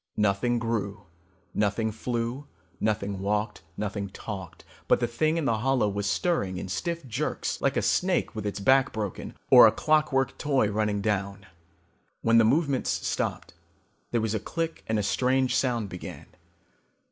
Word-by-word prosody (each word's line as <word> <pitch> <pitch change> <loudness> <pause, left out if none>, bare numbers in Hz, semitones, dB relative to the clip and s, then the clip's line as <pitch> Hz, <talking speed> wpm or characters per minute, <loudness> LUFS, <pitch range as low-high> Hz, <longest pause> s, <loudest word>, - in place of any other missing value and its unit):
Nothing 105 +4 +2
grew, 105 -3 -2 0.5
nothing 105 +2 0
flew, 120 +4 -3 0.3
nothing 100 -2 -1
walked, 105 +1 -1 0.2
nothing 100 -1 -3
talked. 95 -3 -8 0.2
But - - +4
the 120 - +1
thing 155 +8 0
in 165 - -1
the 115 -4 +1
hollow 130 -2 +2
was 100 0 -2
stirring 100 - 0
in 90 - -5
stiff 165 - -3
jerks 125 +6 -2
like 140 +1 +1
a - - +1
snake 185 -6 +1
with 110 - -4
its 100 - -3
back 135 +6 +4
broken 105 -4 -5 0.2
or - - +10
a - - +4
clockwork 150 -3 +1
toy 135 -8 +1
running 105 -1 0
down. 100 -1 -2 0.8
When 115 0 +5
the - - +6
movements 140 +2 +1
stopped, - - -2 0.6
there 120 - 0
was 110 -1 -1
a 110 - 0
click 165 +8 -4
and 110 - +1
a 105 - 0
strange 130 +4 +1
sound 120 -5 0
began. 90 - -8
110 Hz, 160 wpm, -27 LUFS, 100-135 Hz, 0.8 s, or